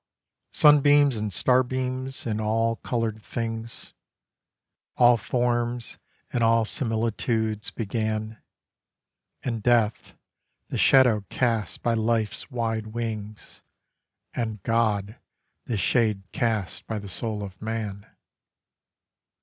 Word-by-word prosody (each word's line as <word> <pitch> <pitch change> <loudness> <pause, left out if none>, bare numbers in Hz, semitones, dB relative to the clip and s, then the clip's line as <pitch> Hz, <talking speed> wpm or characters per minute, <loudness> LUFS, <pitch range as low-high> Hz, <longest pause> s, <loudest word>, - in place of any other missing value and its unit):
Sunbeams 145 -2 +5
and 105 -1 -2
starbeams, 130 +3 0
and 110 -2 -1
all 115 +1 +1
coloured 115 -3 -2
things, 115 0 -5 1.0
All 120 0 +7
forms 120 +1 -1 0.3
and 120 - +1
all 115 0 +4
similitudes 110 -2 -1
began; 110 0 -3 1.0
And 115 -4 -2
death, 115 -1 +1 0.5
the - - -3
shadow 125 -6 +5
cast 115 -4 -1
by 120 - +2
life's 110 0 -1
wide 115 -4 -2
wings, 110 -2 -6 0.7
And 110 -5 -3
God, 110 -2 0 0.5
the 115 - -2
shade 105 0 +1
cast 110 -5 -2
by 110 - -3
the 100 -1 -7
soul 105 +2 -2
of 95 -2 -9
man. 110 -3 -4
115 Hz, 100 wpm, -25 LUFS, 110-120 Hz, 1.0 s, All